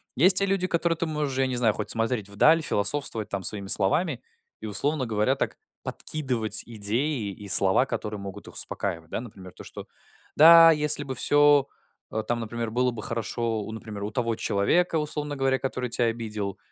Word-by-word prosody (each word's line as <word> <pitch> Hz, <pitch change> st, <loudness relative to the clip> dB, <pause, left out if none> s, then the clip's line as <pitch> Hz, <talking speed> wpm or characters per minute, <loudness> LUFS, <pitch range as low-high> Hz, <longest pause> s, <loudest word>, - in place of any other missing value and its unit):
Есть 185 Hz, +7 st, +5 dB
те 200 Hz, -, +5 dB
люди, 195 Hz, -2 st, -1 dB
которые 170 Hz, -1 st, 0 dB
ты 170 Hz, -, -2 dB
можешь, 150 Hz, -4 st, -3 dB
я 135 Hz, -, +1 dB
не 130 Hz, -, -3 dB
знаю, 115 Hz, -3 st, +2 dB
хоть 105 Hz, -, -5 dB
смотреть 115 Hz, -2 st, -1 dB
вдаль, 155 Hz, +11 st, +4 dB
философствовать 110 Hz, -2 st, -1 dB
там 100 Hz, -1 st, -4 dB
своими 100 Hz, +1 st, -3 dB
словами 125 Hz, -, +1 dB, 0.4 s
и, -, -, -7 dB
условно 140 Hz, +6 st, 0 dB
говоря, 110 Hz, +4 st, 0 dB
так -, -, -3 dB, 0.3 s
подкидывать 120 Hz, -8 st, -2 dB
идеи 115 Hz, +2 st, -1 dB
и 100 Hz, +1 st, -11 dB
слова, 95 Hz, +6 st, +5 dB
которые 105 Hz, -5 st, -5 dB
могут 100 Hz, +1 st, -9 dB
их -, -, -12 dB
успокаивать. 85 Hz, -5 st, -3 dB
Да, -, -, -3 dB
например, 95 Hz, -6 st, -12 dB
то, -, -, -12 dB
что: -, -, -10 dB, 0.5 s
"Да 165 Hz, +1 st, +8 dB
если 150 Hz, -2 st, +3 dB
бы 135 Hz, -2 st, -5 dB
всё, 145 Hz, +1 st, +4 dB, 0.4 s
э, 110 Hz, -, -3 dB
там, 120 Hz, 0 st, -1 dB
например, 115 Hz, 0 st, -5 dB
было 125 Hz, +2 st, +1 dB
бы 110 Hz, -3 st, -8 dB
хорошо, 115 Hz, 0 st, -3 dB
у, 105 Hz, -, -7 dB
например, 110 Hz, -2 st, -8 dB
у 105 Hz, -, -4 dB
того 115 Hz, 0 st, -2 dB
человека, 160 Hz, -, 0 dB
условно 150 Hz, -1 st, -4 dB
говоря, 135 Hz, -1 st, 0 dB
который 130 Hz, -1 st, -4 dB
тя 120 Hz, -, 0 dB
обидел, 110 Hz, -4 st, -4 dB
120 Hz, 185 wpm, -25 LUFS, 105-145 Hz, 0.5 s, Да